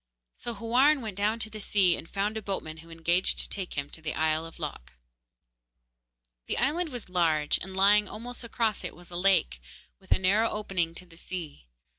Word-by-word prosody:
So 240 -1 -4
Houarn 255 +7 +4
went 215 -4 -5
down 210 +3 +1
to 225 -1 -3
the 215 - -7
sea, 195 -4 +3
and 165 - -9
found 205 +2 -1
a 220 - -2
boatman 175 -6 -4
who 165 +1 -14
engaged 170 +2 +2
to - - 0
take 190 -3 -5
him 140 -1 -2
to 160 - -11
the 155 -1 -3
isle 155 +1 +1
of 165 - -12
Lok. 65 +2 -6 1.5
The - - -1
island 315 +6 +1
was 245 -5 -7
large, 165 -5 +2
and 190 +1 -6
lying 205 +2 +5
almost 240 +3 -7
across 225 -2 0
it - - -5
was 175 0 -15
a - - -3
lake, 175 - +2 0.4
with - - -22
a - - +6
narrow 200 +5 +3
opening 180 -6 -2
to 180 - -9
the 165 -2 -16
sea. 165 - -7
190 Hz, 200 wpm, -29 LUFS, 165-220 Hz, 1.5 s, a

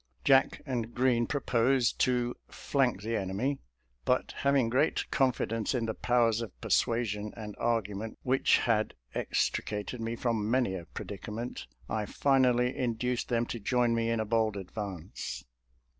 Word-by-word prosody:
Jack 135 -1 +4
and 120 -4 -3
Green 120 -2 +2
proposed 130 -3 +2
to 125 -1 +1
" - - -40 0.2
flank 130 -8 +1
the 115 +1 -1
en 95 -3 -2
emy," 130 +9 -1 0.4
but - - +1
having 140 -3 +3
great 130 +7 +1
confldence 115 -3 +1
in 120 -2 0
the 110 - -2
powers 120 -2 +2
of 110 -6 -7
persuasion 105 -3 0
and 105 -2 -6
argument 110 -2 -1
which 130 +1 +4
had 110 -3 +1 0.2
extri - - 0 0.2
cated 125 - -6
me 115 +1 -2
from 115 -3 -1
many 125 -5 +2
a 90 -3 -5
predicament, 105 +8 -6 0.2
I 105 -2 -2
flnally 125 -3 +3
induced 125 0 -1
them 120 -1 +1
to 120 - -5
join 120 +2 +2
me 115 0 +1
in 115 -1 +1
a 110 - 0
bold 110 -1 +1
advance. 95 -2 -6
115 Hz, 155 wpm, -30 LUFS, 110-125 Hz, 0.4 s, Jack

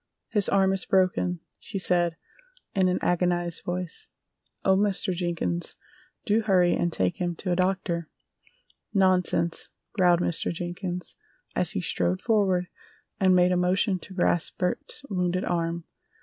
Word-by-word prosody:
"His 205 -3 +2
arm 195 -1 +3
is 190 - -2
broken," 185 -2 +2 0.2
she - - -5
said, 175 -3 +1 0.6
in 190 -1 +3
an 180 - +1
agonized 175 -1 0
voice. 180 -1 -4 0.6
"Oh, 190 - +5
Mr. 195 -1 +1
Jenkins, 175 -1 -2 0.5
do 215 +1 +3
hurry 185 -5 +3
and 175 - 0
take 95 - -1
him 175 -1 -1
to 180 +2 -3
a - - +2
doctor!" 180 -3 -1 0.9
"Nonsense!" 185 -3 +2 0.2
growled 180 -3 +4
Mr. 175 - 0
Jenkins, 175 +1 -4 0.4
as - - 0
he - - -1
strode 90 +1 0
forward 195 -5 +2 0.5
and 185 -1 +5
made 180 0 +4
a - - +3
motion 185 +2 +2
to 190 - -11
grasp 175 -2 +1
Bert's 280 +10 -2
wounded 180 -2 -1
arm. 170 -1 -1
180 Hz, 140 wpm, -26 LUFS, 175-190 Hz, 0.9 s, Oh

